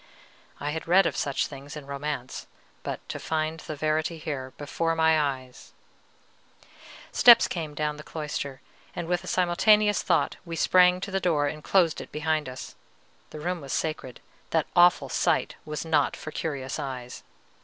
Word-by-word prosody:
I 145 - -2
had 160 +2 -5
read 190 +3 +5
of - - 0
such 140 -2 0
things 140 +1 -9
in 145 - -9
romance; 140 -2 -5 0.3
but - - -6
to - - -5
find 160 0 -2
the 155 - -6
verity 155 +2 -1
here, 140 -4 -5
before 165 +3 -1
my 160 -1 +4
eyes 130 -3 -5 1.4
Steps 240 -2 +8
came 155 -4 -5
down 150 0 -2
the 150 - -9
cloister, 150 -4 -5 0.3
and 170 - -4
with 175 0 0
a - - -10
simultaneous 205 +4 +3
thought - - +1
we 170 -2 -6
sprang 180 +2 +4
to 200 - -5
the 195 - 0
door 160 -6 +1
and 150 +1 -4
closed 175 -5 +2
it - - -11
behind 155 -2 -1
us. 130 - -8 0.6
The 155 - -9
room 175 +1 -2
was 135 -2 -6
sacred; 155 -5 -3 0.3
that 160 -2 +1
awful 175 0 +5
sight - - +1
was 150 +1 -4
not 155 -3 +2
for 155 - -7
curious 140 -5 -4
eyes. 125 -2 -6
155 Hz, 165 wpm, -27 LUFS, 145-170 Hz, 1.4 s, Steps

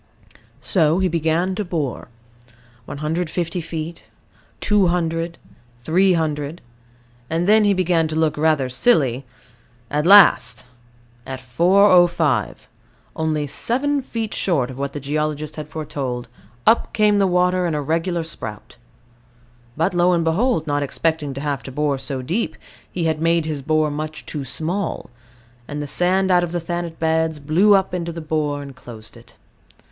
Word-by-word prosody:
So 160 -3 +2
he 190 0 +2
began 170 +2 0
to 210 - -2
bore 160 - -3 0.8
150 165 +4 -3
feet, 160 +1 -6 0.5
200, 170 -4 0 0.5
300: 160 -2 +1 0.7
and 165 +2 -1
then 215 +1 +5
he 205 -1 +4
began 175 -3 +1
to 155 - -5
look 160 -1 +1
rather 150 -3 +1
silly; 130 - +2 0.7
at 150 +3 0
last, 125 - +6 0.6
at 130 -1 -5
405 175 +1 +3 0.5
only 155 -2 -1
seven 270 - 0
feet 225 -4 -4
short 140 -9 0
of 130 - -10
what 140 0 -3
the 145 - -4
geologist 150 +2 -3
had 155 - -6
foretold 140 -6 -5 0.4
up 230 - +3
came 210 -1 +3
the 195 - +3
water 180 0 +2
in 160 - -1
a 150 - -1
regular 165 +3 -1
spout. 110 -10 -7 1.0
But, 165 +2 +1
lo 175 +1 +3
and 170 -1 +1
behold, 170 +3 +1
not 145 -1 -1
expecting 150 0 -1
to 135 - -5
have 145 -3 -2
to 135 - -9
bore 145 0 -1
so 130 0 -4
deep, 180 - -2 0.4
he 175 - -3
had 160 -1 0
made 165 -1 +2
his 155 -3 -3
bore 155 +1 +1
much 155 +1 -6
too 150 -3 -5
small; 165 +4 -3 0.6
and 145 0 -5
the 145 - -3
sand 185 +5 +1
out 180 -1 +4
of 175 - -3
the 175 - 0
Thanet 170 0 -4
beds 160 -1 0
"blew 165 +8 +4
up" 190 -1 0
into 170 -1 -3
the 165 - -7
bore, 150 -2 -2
and 140 -1 -10
closed 110 -4 -12
it. - - -17
160 Hz, 150 wpm, -21 LUFS, 145-180 Hz, 1.0 s, last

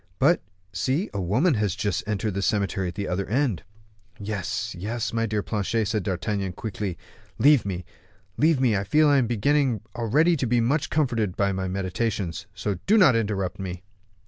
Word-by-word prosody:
But, - - +4 0.3
see, 130 - -1
a 100 - -2
woman 125 - +2
has 105 -6 0
just 100 -3 -1
entered 105 0 -1
the 100 - -2
cemetery 100 -2 0
at 90 - -6
the 100 -1 -3
other 95 +2 -2
end." 120 - 0 0.6
"Yes, 100 -3 -3
yes, 110 +7 -3
my 115 0 0
dear 105 -1 -1
Planchet," 110 +1 -1
said 110 -1 0
D'Artagnan, 95 +1 -2
quickly, 100 -3 -4 0.4
"leave 140 -6 +5
me, 90 -2 -4 0.5
leave 155 -1 +3
me; 125 -5 +3
I 95 - 0
feel 155 +8 +4
I 145 - +5
am 120 - +1
beginning 125 +1 +1
already 145 +9 +3
to 130 - -1
be 120 +1 +2
much 140 +7 +1
comforted 115 - 0
by 100 -1 +2
my 95 0 -2
meditations, 95 0 -2
so 95 -1 -3
do 215 +3 +5
not 180 - +6
interrupt 100 -5 -1
me." 90 -1 -5
105 Hz, 180 wpm, -25 LUFS, 95-125 Hz, 0.6 s, not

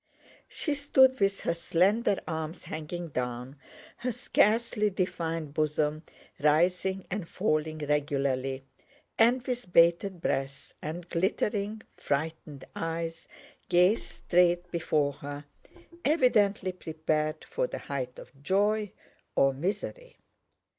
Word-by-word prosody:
She 300 - -1
stood 265 -2 +4
with 195 0 +1
her 170 - 0
slender 190 +6 +2
arms 160 0 -4
hanging 165 +2 -5
down, 125 0 -4 0.4
her 250 +1 -2
scarcely 220 -1 +2
defined 165 -5 -2
bosom 155 0 0 0.4
rising 180 +5 +2
and 190 -3 -3
falling 155 -5 0
regularly, 140 -3 -1 0.6
and 240 +2 +4
with 245 -7 -4
bated 170 +2 +4
breath 135 -4 -2
and 165 +3 -5
glittering, 205 +4 -1
frightened 150 -1 -3
eyes 165 0 -4 0.4
gazed 180 +5 +3
straight 175 0 +2
before 150 -4 +1
her, 145 +1 -7 0.6
evidently 210 - +3
prepared 155 -3 -2
for - - -1
the - - -5
height 130 -3 -4
of 135 +1 -13
joy 205 +5 +1 0.4
or 135 0 +4
misery. 205 - -4
170 Hz, 105 wpm, -29 LUFS, 150-200 Hz, 0.6 s, stood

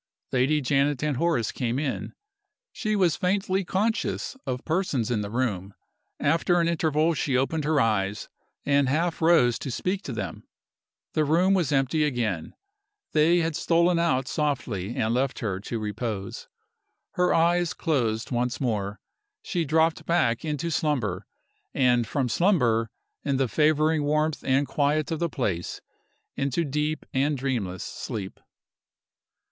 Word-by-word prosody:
Lady 135 +4 +2
Janet 140 +1 +1
and 150 -4 0
Horace 165 -9 +1
came 120 0 -2
in. 140 -2 -3 0.6
She 215 -2 -1
was 180 -6 +3
faintly 190 +1 0
conscious 215 +8 -1
of 125 -1 -3
persons 155 - 0
in 110 -3 +1
the 100 - -4
room. 105 -5 -2 0.4
After 165 +4 +2
an 170 - +2
interval 160 -1 +2
she 140 -4 0
opened 145 +3 0
her 155 -1 +2
eyes, 105 -3 0 0.4
and 140 -2 +3
half 165 +5 0
rose 160 -8 +4
to - - -5
speak 185 +10 -2
to 140 - -6
them. 100 -7 -5 0.7
The 155 - +2
room 170 +6 +3
was 175 -6 +1
empty 140 +3 +2
again. 115 - -2 0.6
They 165 +3 +4
had 165 -1 -1
stolen 170 +2 +2
out 135 -6 +1
softly 120 - -2
and 110 +1 0
left 130 +1 0
her 100 -5 -2
to 115 +4 -4
repose. 105 -2 -4 0.6
Her 180 0 +1
eyes 170 +1 +2
closed 120 -9 -1
once 120 0 -1
more. 105 -5 -2 0.4
She 175 -4 -1
dropped 160 +2 +1
back 165 -9 +2
into 155 +1 -2
slumber, 130 - -1 0.5
and 125 -3 +3
from 135 +3 0
slumber, 120 - +2 0.3
in 140 -2 0
the 135 -1 +1
favoring 155 +3 +2
warmth 155 +1 0
and 135 +1 +2
quiet 150 +1 0
of 160 - -1
the 170 - 0
place, 95 - -2 0.6
into 140 +4 0
deep 150 +2 -2
and 140 +2 +1
dreamless 115 -9 -2
sleep. 95 -3 -6
140 Hz, 145 wpm, -26 LUFS, 120-160 Hz, 0.7 s, rose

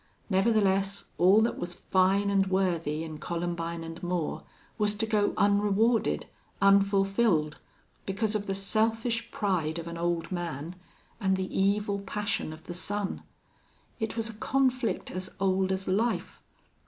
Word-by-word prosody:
Nevertheless, 195 -1 +2 0.2
all 190 +5 +6
that 230 - 0
was 175 0 -3
fine 195 +2 +2
and 195 -1 +3
worthy 170 -5 0
in 155 -2 -7
Columbine 170 0 -3
and 165 +1 -8
Moore 175 -3 -2 0.4
was 210 0 +2
to 220 +2 0
go 210 -2 +2
unrewarded, 205 - +2 0.3
unfulfilled, 195 -4 +3 0.5
because 205 +2 -1
of 210 -1 -2
the 195 - -1
selfish 225 +3 0
pride 170 -6 -1
of 170 0 -5
an 170 0 -6
old 170 0 -1
man 170 -2 -4 0.4
and 190 -3 +2
the 190 0 -4
evil 200 +1 +1
passion 200 -3 -2
of 155 0 -11
the 175 - -7
son. 200 +3 -3 0.8
It 220 0 -3
was 225 0 0
a 225 - -5
conflict 255 +2 0
as 185 +1 -6
old 190 -1 +2
as 190 0 -2
life. 220 +5 -1
195 Hz, 140 wpm, -28 LUFS, 175-210 Hz, 0.8 s, all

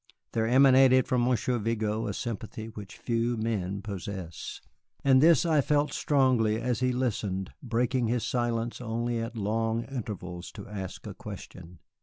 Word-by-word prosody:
There 110 -1 0
emanated 130 0 +6
from 125 -1 +2
Monsieur 125 0 +1
Vigo 110 0 -1
a - - -2
sympathy 110 -1 -5
which 105 -3 -10
few 115 0 0
men 100 -3 -2
possess, 95 -4 -6 0.4
and 130 -1 +6
this 165 0 +6
I 155 -3 +4
felt 145 +1 +1
strongly 125 -6 +2
as 120 0 -1
he 130 0 +2
listened, 105 -7 -2
breaking 120 -1 0
his 120 0 0
silence 120 -1 -1
only 120 0 -1
at 115 +1 -4
long 115 +2 0
intervals 95 -9 -6
to 100 - -9
ask 100 -3 -6
a - - -6
question. 90 0 -10
115 Hz, 150 wpm, -28 LUFS, 105-125 Hz, 0.4 s, emanated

